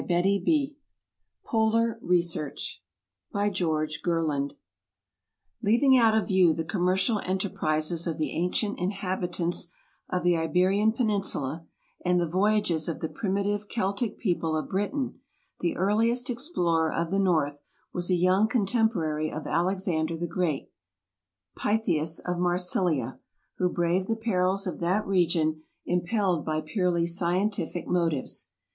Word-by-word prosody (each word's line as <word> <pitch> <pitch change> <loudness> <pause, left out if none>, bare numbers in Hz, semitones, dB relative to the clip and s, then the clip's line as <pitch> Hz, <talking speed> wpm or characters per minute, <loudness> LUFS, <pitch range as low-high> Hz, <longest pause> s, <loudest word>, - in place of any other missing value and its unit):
AMERICA 200 - +2 0.7
Polar 225 0 +2
Research 170 - -1 0.5
By 205 0 +1
GEORG 155 -5 -1
GERLAND 155 -5 0 1.1
LEAVING 240 +5 +4
out 225 -3 +5
of 220 - 0
view 185 -5 +4
the 165 - -2
commercial 190 +5 +1
enterprises 170 -3 -1
of 165 - -2
the 155 - -1
ancient 180 +5 -1
inhabitants 180 -2 -2 0.4
of 180 -1 -1
the 175 -1 +4
Iberian 185 +6 +2
Peninsula 195 - -1 0.4
and 180 0 +3
the 170 - +1
voyages 185 -2 +1
of 165 - -3
the 160 - -3
primitive 205 0 -1
Celtic 205 +1 -1
people 170 -6 0
of 155 - -4
Britain, 205 +8 -2 0.4
the 175 - -1
earliest 230 +6 +1
explorer 175 - 0
of 165 +1 -2
the 195 - +2
north 155 -7 +1 0.3
was 175 0 -2
a 185 - +4
younger 185 +5 +3
contemporary 195 -9 +1
of 155 - -5
Alex 185 +3 0
ander 160 -1 0
the 170 - -2
Great, 170 -4 -2 0.8
Pytheas 170 -7 0
of 180 -1 -1
Marsilia, 175 -7 0 0.4
who 180 - +2
braved 175 +2 +1
the 225 - +1
perils 195 -3 0
of 185 - -4
that 185 +5 +1
region, 165 -4 +1 0.2
impelled 180 -1 +1
by 155 0 -1
purely 170 +1 0
scientific 175 +1 -1
motives. 165 -6 -1
180 Hz, 125 wpm, -27 LUFS, 165-205 Hz, 1.1 s, out